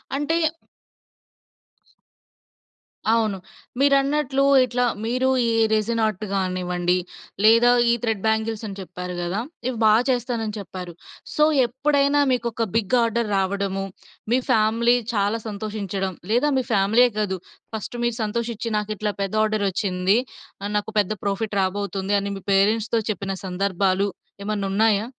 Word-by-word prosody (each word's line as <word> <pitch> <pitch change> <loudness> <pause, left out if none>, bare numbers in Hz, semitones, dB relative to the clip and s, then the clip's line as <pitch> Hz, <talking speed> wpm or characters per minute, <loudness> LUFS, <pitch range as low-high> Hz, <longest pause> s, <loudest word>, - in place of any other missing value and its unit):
అంటే 295 +4 0 2.8
అవును. 220 -4 +1 0.4
మీరన్నట్లు 275 0 +2 0.2
ఇట్లా 245 0 -1 0.2
మీరు 255 +3 0 0.2
ఈ - - +2 0.2
రెసిన్ 225 +1 +1
ఆర్ట్ 215 -1 -2
కానివ్వండి 180 -2 0 0.5
లేదా 230 +3 +6 0.2
ఈ - - +5
థ్రెడ్ 220 -4 -1
బ్యాంగిల్స్ 220 0 0
అని 200 -1 -7
చెప్పారు 180 0 -7
గదా! 175 +4 -2 0.3
ఇవి 255 -2 -2
బా 215 - +6 0.2
చేస్తానని 235 -4 -1
చెప్పారు. 180 -2 -8 0.4
సో, 300 - +4 0.2
ఎప్పుడైనా 280 +3 +2
మీకు 240 -2 0
ఒక 230 +1 -1
బిగ్ 225 +1 +2
ఆర్డర్ 230 -1 0
రావడము, 195 0 -1 0.5
మీ 250 - +4
ఫ్యామిలీ 230 +1 +3 0.2
చాలా 205 +2 +1
సంతోషించడం, 200 -2 -3 0.2
లేదా 250 +6 +3
మీ 260 - +1
ఫ్యామిలీయే 220 +4 +4
కాదు 195 -3 -1 0.4
ఫస్ట్ 220 +3 -6
మీరు 240 -1 -1
సంతోషించి, 235 +2 -3
నాకు 210 0 -3
ఇట్లా 210 0 -2
పెద్ద 195 0 -2
ఆర్డర్ 215 -1 0
వచ్చింది. 190 +1 +1 0.5
ఆహ్, 205 - -3
నాకు 210 - -3
పెద్ద 205 0 +1
ప్రాఫిట్ 200 +1 -2
రాబోతుంది, 195 +1 -1
అని 200 0 -3
మీ 195 - -11
పేరెంట్స్‌తో 215 +3 +2
చెప్పిన 195 0 -4
సందర్భాలు 190 +1 0 0.4
ఏమన్న 210 -1 -2
ఉన్నాయా? 215 0 +3
215 Hz, 130 wpm, -23 LUFS, 195-235 Hz, 2.8 s, లేదా